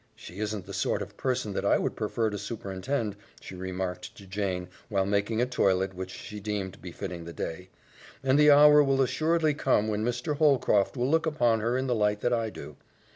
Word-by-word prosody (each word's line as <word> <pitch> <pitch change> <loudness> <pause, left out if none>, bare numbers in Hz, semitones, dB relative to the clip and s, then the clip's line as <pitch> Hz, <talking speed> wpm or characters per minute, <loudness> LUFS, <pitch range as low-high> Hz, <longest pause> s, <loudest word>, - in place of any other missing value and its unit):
"She 90 - -11
isn't 105 -3 -3
the - - -9
sort - - 0
of - - -12
person 125 -5 -2
that - - -2
I - - +4
would - - -2
prefer 110 -2 -1
to 105 - -3
superintend," 105 +2 -3 0.2
she - - -10
remarked 90 0 -5
to 100 - -12
Jane 95 -2 -3 0.2
while 100 -3 +1
making 105 +4 +1
a - - +2
toilet 95 -6 +1
which 95 0 -6
she 105 +2 -8
deemed 100 -2 -4
befitting 90 -1 -7
the 85 - -8
day, 90 +3 -5 0.5
"and 135 +2 +3
the 150 0 +7
hour 150 +1 +8
will 135 -1 +2
assuredly 155 +4 +1
come 110 -6 +1
when 105 0 -1
Mr. 125 +5 -2
Holcroft 135 -8 +3
will 125 +3 0
look 160 0 +2
upon 120 -7 +2
her 115 +3 0
in 130 - -1
the 125 - +1
light 105 -2 +1
that 120 - +1
I 115 -2 0
do. 75 -7 -10
105 Hz, 205 wpm, -28 LUFS, 95-130 Hz, 0.5 s, hour